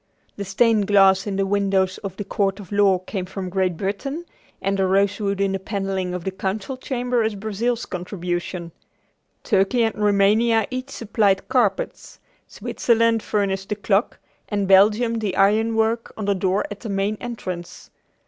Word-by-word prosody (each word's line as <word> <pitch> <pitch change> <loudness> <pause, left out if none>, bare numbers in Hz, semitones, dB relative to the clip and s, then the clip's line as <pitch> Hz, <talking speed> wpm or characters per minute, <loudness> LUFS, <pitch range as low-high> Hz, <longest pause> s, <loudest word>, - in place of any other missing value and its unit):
The 200 - -5
stained 210 +1 +2
glass 195 -1 +5
in 200 - -2
the 195 0 +1
windows 195 -1 +1
of 190 -2 -7
the 205 - -3
Court 195 0 -1
of 195 -2 -11
Law 200 -2 +4
came 185 0 -5
from 190 -1 -6
Great 185 -2 0
Britain, 275 - -3 0.3
and 195 +1 -1
the 190 - +2
rosewood 200 +1 +1
in 195 -1 +1
the 195 - -2
paneling 190 -2 -3
of 180 - -5
the 190 - -2
Council 195 +6 -3
Chamber 250 -2 -1
is 220 -1 0
Brazil's 220 +4 -2
contribution. 175 -1 -4 0.7
Turkey 205 +4 +2
and 225 -1 +1
Roumania 210 +2 +3
each 255 +1 -4
supplied 205 -5 0
carpets, 215 -7 0 0.3
Switzerland 230 -1 +1
furnished 195 -2 -1
the 210 - -1
clock, 205 +1 0 0.3
and 205 -2 -1
Belgium 215 +4 +4
the 205 -4 -2
iron 220 +3 +3
work 225 +1 0
on 215 - -3
the 200 - +2
door 190 +1 0
at 205 - -6
the 225 - -7
main 200 +2 0
entrance. 185 -8 -7
200 Hz, 165 wpm, -22 LUFS, 190-220 Hz, 0.7 s, glass